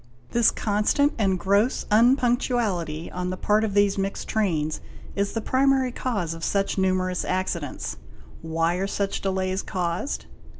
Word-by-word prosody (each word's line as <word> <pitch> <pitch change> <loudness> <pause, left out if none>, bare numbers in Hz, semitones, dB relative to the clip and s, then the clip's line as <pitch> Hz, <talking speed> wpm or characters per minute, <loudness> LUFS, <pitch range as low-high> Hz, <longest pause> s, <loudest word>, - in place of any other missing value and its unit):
This 235 -1 +4
constant 215 +8 +1
and 195 -3 +2
gross 200 +7 +1
unpunctuality 230 - +2
on 180 0 -3
the 185 - -3
part 210 +3 +2
of 205 -2 -2
these 205 -1 +3
mixed 195 0 -3
trains 160 -8 0 0.3
is 200 0 -1
the 225 - -2
primary 265 +1 +2
cause 200 -10 -2
of 165 0 -9
such 200 -1 0
numerous 185 -1 0
accidents. 180 -5 -3 0.4
Why 165 +2 0
are 195 +1 -1
such 200 0 -2
delays 190 0 -1
caused? 180 +7 -3
195 Hz, 140 wpm, -25 LUFS, 180-220 Hz, 0.4 s, This